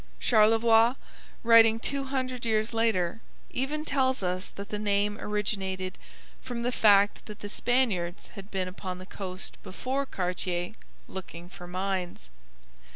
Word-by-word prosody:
Charlevoix, 225 +1 +5 0.5
writing 225 -1 +7
two 275 +3 -1
hundred 255 -2 -3
years 220 0 +1
later, 225 -3 +1 0.3
even 300 +4 -2
tells 260 -6 +1
us 180 +1 -1
that 200 0 -9
the 210 - -3
name 205 0 +1
originated 190 -3 -2 0.4
from 245 -2 -5
the 245 - +1
fact 205 -3 +4
that 210 -1 -9
the 205 - -5
Spaniards 205 -8 0
had 195 0 -10
been 190 -2 -2
upon 185 0 -6
the 185 - -9
coast 185 -1 -7
before 265 +8 -3
Cartier, 180 -1 -2 0.3
looking 175 -2 -8
for 180 -1 -10
mines. 180 - -3
210 Hz, 135 wpm, -28 LUFS, 185-235 Hz, 0.5 s, writing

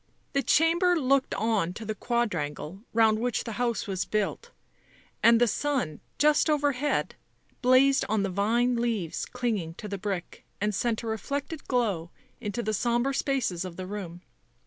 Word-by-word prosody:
The 275 - +2
chamber 340 +4 +3
looked 275 -1 +2
on 205 -4 0
to 220 +3 -7
the 215 - -2
quadrangle 190 -7 -2
round 220 -1 +4
which 245 0 -1
the 230 - -5
house 235 -2 0
was 195 -3 -2
built; 215 - -2 0.7
and 230 0 +6
the 240 - +5
sun, 245 - -1 0.2
just 300 +1 +4
overhead, 290 -1 +1 0.5
blazed 260 +2 +5
on 215 -1 +1
the 195 - -1
vine 235 +6 +2
leaves 225 -8 -1
clinging 215 -10 -2
to 210 - -7
the 200 -1 -4
brick 190 -2 -4 0.2
and 210 +1 0
sent 225 +3 -1
a - - -5
reflected 280 +8 -4
glow 205 -10 0 0.3
into 220 +1 -3
the 215 - -1
sombre 240 +5 +1
spaces 260 -11 0
of 185 -2 -7
the 185 - -6
room. 185 -3 -7
230 Hz, 160 wpm, -28 LUFS, 195-255 Hz, 0.7 s, and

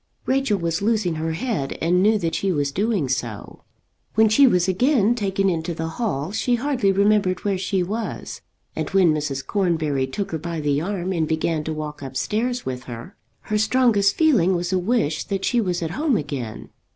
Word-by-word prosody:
Rachel 265 -5 +1
was 170 -1 -2
losing 210 -5 +1
her 160 +1 -2
head 170 - -3
and 175 +3 +2
knew 215 +2 +4
that 165 -5 -2
she 195 - 0
was 145 -4 0
doing 200 - 0
so. 120 -5 -4 0.5
When 220 0 +5
she 270 +6 +6
was 180 -6 +3
again 230 +3 +3
taken 195 -4 0
into 170 -2 -1
the 160 0 -3
hall 160 - -2
she 240 +3 +1
hardly 245 -5 +1
remembered 200 -1 +2
where 195 -2 0
she 190 0 0
was, 220 +5 -5 0.3
and - - -3
when 185 -5 +4
Mrs. 145 -3 -3
Cornbury 160 -9 0
took 195 +9 -4
her 160 - -2
by 170 +1 -4
the 145 -1 0
arm 190 0 -2
and 160 -3 0
began 160 0 -1
to 160 - -2
walk 150 -1 -6
up 135 -1 -6
stairs 235 - -1
with 125 0 -5
her, 120 - -9 0.3
her 210 0 -1
strongest 220 -3 +3
feeling 230 - +3
was 175 +1 -2
a 185 - +2
wish 180 -6 0
that 195 -1 -2
she 240 -2 +2
was 180 -4 -1
at 160 - -3
home 285 - +1
again. 135 -8 -5
185 Hz, 195 wpm, -22 LUFS, 155-215 Hz, 0.5 s, she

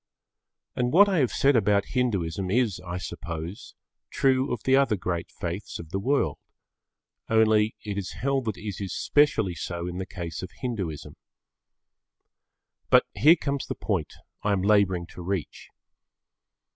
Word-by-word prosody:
And 125 0 0
what 200 +5 +7
I 190 -4 +2
have 130 -4 +3
said 140 0 +3
about 100 -2 +2
Hinduism 95 -8 0
is, 110 -3 +1
I 90 -1 -5
suppose, 85 0 -6 0.3
true 130 0 +2
of 125 - -3
the 130 - +4
other 135 -5 +3
great 90 -2 -3
faiths 90 +4 -5
of 85 -1 -10
the 95 - -1
world, 135 +8 0 0.9
only 110 -1 +3
it 100 -1 -3
is 95 - -5
held 135 -1 -1
that 110 -3 -2
it 105 -2 -6
is 95 - -4
specially 115 -11 +2
so 85 0 -5
in 90 +1 -4
the 95 - -4
case 85 -2 -6
of 95 - -6
Hinduism. 100 - -4 1.7
But - - +6
here 160 +4 +6
comes 140 -4 -3
the - - -3
point 95 -8 -2 0.3
I 105 - +1
am 95 -2 0
labouring 100 -4 +3
to - - -9
reach. 90 -2 -4
100 Hz, 155 wpm, -26 LUFS, 90-125 Hz, 1.7 s, what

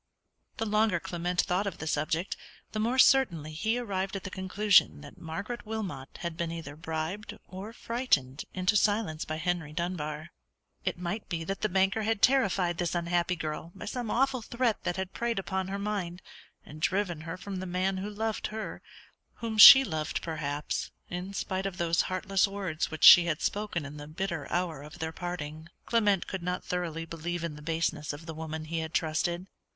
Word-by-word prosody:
The 225 - -1
longer 210 -4 +2
Clement 175 0 -1
thought 190 +3 0
of 200 - -4
the - - -6
subject, 160 +4 -1 0.4
the 215 - -3
more 235 +4 +1
certainly 175 - +4
he 220 +9 0
arrived 195 -5 -2
at 195 - -4
the 185 - -6
conclusion 190 -2 +3
that 145 -1 -12
Margaret 200 +9 -5
Wilmot 200 -12 -5
had 170 -1 -3
been, 170 -1 -2
either 160 -4 -6
bribed 160 +5 -4
or 190 +4 -7
frightened 230 - 0
into 185 +2 +1
silence 205 -6 +1
by 155 - -3
Henry 160 -2 -2
Dunbar. 155 -2 -3 0.5
It - - -1
might 180 +5 -4
be 165 -2 -2
that 195 +4 -4
the 215 - +1
banker 195 +3 +2
had 220 -1 -1
terrified 195 -9 +3
this 175 -1 -1
unhappy 175 +1 +1
girl 160 +1 -5
by - - -8
some 240 +1 -4
awful 260 +1 +2
threat 235 0 -1
that 175 - -1
had 190 0 -4
preyed 235 -2 -1
upon 190 -1 -2
her 195 +1 -3
mind, 200 -4 -3 0.4
and 155 +1 -11
driven 180 -3 0
her 165 +3 -6
from 195 +1 -6
the 185 0 -4
man 185 +2 0
who 195 +2 -3
loved 220 +1 -2
her, 220 0 -6 0.5
whom 225 -2 -4
she 270 +6 +13
loved 155 - -3
perhaps, 150 -2 -3 0.2
in 180 +2 -4
spite 190 0 -2
of 190 -2 -6
those 170 -1 +2
heartless 185 +1 +2
words 195 -5 -3
which 155 - -6
she 175 -1 +11
had 155 -3 -1
spoken 205 -7 -1
in 145 +1 -8
the 145 0 -8
bitter 165 -2 -4
hour 175 -5 -1
of 150 +3 -11
their 160 -2 -3
parting. 160 -2 -6 0.2
Clement 205 -5 +2
could 190 - -5
not 180 +1 -2
thoroughly 165 -2 -3
believe 165 +1 -4
in 165 -3 -3
the 150 - -11
baseness 160 -1 -1
of 150 +3 -9
the 160 - -6
woman 160 0 -5
he 165 +1 -2
had 160 0 -5
trusted. 170 +3 0
180 Hz, 190 wpm, -29 LUFS, 160-200 Hz, 0.5 s, she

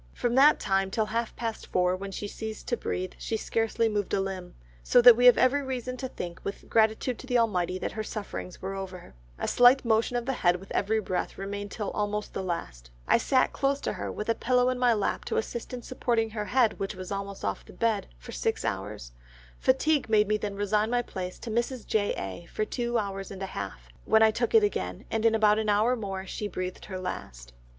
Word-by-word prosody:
From 240 - 0
that 280 +4 +6
time 195 0 +1
till 215 +2 0
half 230 +2 -2
past 225 -2 -4
four 180 0 +2
when 195 +1 -6
she 205 +2 -4
ceased 220 +1 -7
to 240 - +2
breathe, 185 -5 -3
she 225 - -2
scarcely 225 +1 0
moved 205 -2 -1
a - - +1
limb, 190 -2 -4 0.3
so 245 - +4
that 245 -1 +10
we 245 +2 +5
have 245 - +8
every 280 +3 +4
reason 255 -2 -4
to 260 - -4
think 175 -8 -7
with 200 - -6
gratitude 220 +2 +2
to 260 - -10
the 245 -1 +2
Almighty, 185 -6 +1
that - - -3
her 220 - -4
sufferings 205 -4 -6
were 195 +1 -3
over. 190 - -7 0.2
A - - -3
slight 245 +2 +6
motion 225 +2 +2
of 240 - -3
the 270 - 0
head 175 -7 +3
with 190 +2 -10
every 220 +2 +1
breath 185 -3 -3
remained 200 +1 -5
till 210 0 -4
almost 210 0 -2
the - - -3
last. - - -5 0.2
I - - +5
sat 255 +2 +2
close 275 0 +1
to - - -2
her - - -4
with 210 - -5
a 230 - +3
pillow 250 +1 +2
in 255 - -3
my 250 -1 +4
lap 205 - -1
to 450 - -2
assist 240 - -3
in 245 -1 -6
supporting 230 -3 0
her 210 -1 -3
head 245 -1 +2
which 195 +1 -3
was 185 +1 -8
almost 200 0 -4
off - - -2
the - - -14
bed, 225 -3 0
for - - -11
six - - -1
hours; - - -4 0.5
fatigue 275 0 +2
made 210 -2 +4
me 215 +1 +2
then 205 -1 -4
resign 210 +2 +1
my 245 0 +1
place 185 -4 -6
to 230 - -7
Mrs. 235 +1 -1
J. 205 -2 +1
A. 95 - -6
for 215 - -2
two 240 +1 -1
hours 195 -2 -3
and 195 0 -7
a 190 - -6
half, 65 -12 -6 0.2
when 220 - +5
I 220 - +6
took 235 - -1
it 445 - +7
again, 415 - -2
and 225 0 +2
in 225 - +3
about 215 -1 +4
an 215 -1 -1
hour 215 +5 +3
more 195 -4 -5
she 210 +2 -4
breathed 185 -1 -5
her 190 -3 -6
last. - - -6
215 Hz, 230 wpm, -28 LUFS, 195-240 Hz, 0.5 s, that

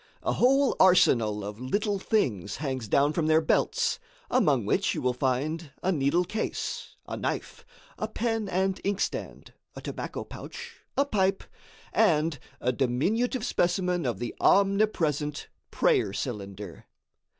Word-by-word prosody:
A - - +1
whole 270 +1 +3
arsenal 130 - +4
of 105 +1 -7
little 205 - -1
things 115 - 0
hangs 130 -5 -3
down 140 +7 +3
from 155 0 0
their 155 0 +5
belts, 160 - +1 0.3
among - - +3
which - - +1
you - - -3
will 125 0 +2
find 140 +6 -1
a 190 - +2
needle 155 +2 +2
case, 220 +5 -4
a - - -4
knife, - - -4 0.4
a 215 - -1
pen 225 -1 -2
and 190 +1 0
inkstand, 200 -1 -3 0.2
a - - -7
tobacco - - -5
pouch, 475 0 -9 0.2
a 280 - +4
pipe, 195 -6 +1 0.5
and 160 - +3 0.2
a 125 - +1
diminutive 205 - 0
specimen 180 - +1
of 120 -5 -1
the 120 +3 -4
omnipresent 190 -8 +2 0.2
prayer 95 - +2
cylinder. 100 -6 -6
165 Hz, 135 wpm, -27 LUFS, 130-205 Hz, 0.5 s, their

